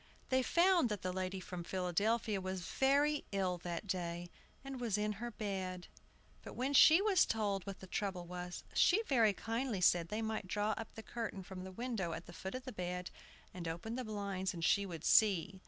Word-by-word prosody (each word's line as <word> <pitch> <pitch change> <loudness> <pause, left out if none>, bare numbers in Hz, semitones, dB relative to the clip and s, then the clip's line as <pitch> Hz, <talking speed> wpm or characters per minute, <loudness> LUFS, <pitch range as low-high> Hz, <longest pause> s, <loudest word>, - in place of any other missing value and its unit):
They 260 0 +3
found 345 -1 +4
that 210 -3 -3
the 185 0 -1
lady 185 +1 -2
from 180 -1 -6
Philadelphia 195 +4 0
was 185 0 -3
very 285 +2 +2
ill 185 -3 0
that 175 +2 -4
day, 175 -2 -3 0.3
and 270 -2 -6
was 225 -4 0
in 210 0 0
her 240 - -2
bed. 190 -5 -4 0.5
But - - -9
when 265 +3 -1
she 320 +6 +8
was 410 -3 +5
told 205 -3 -1
what 195 - -6
the - - -8
trouble 190 -2 -3
was, 180 0 -6
she 420 +6 +4
very 235 - +4
kindly 230 +1 -2
said 175 -1 +4
they 215 +5 -3
might 220 -3 -3
draw 210 +3 0
up 225 0 -5
the 220 - -8
curtain 225 -5 -5
from 185 0 -8
the 190 - -7
window 215 -5 -3
at 165 +1 -6
the 175 - -11
foot 190 +6 -6
of 255 0 -6
the 255 - -5
bed, 180 -1 -4 0.4
and 175 -2 -5
open 170 +8 -4
the 255 - -3
blinds, 200 -3 -3
and 165 -1 -2
she 200 +3 +3
would 165 -4 -7
see. 195 -3 +4
200 Hz, 205 wpm, -36 LUFS, 180-230 Hz, 0.5 s, she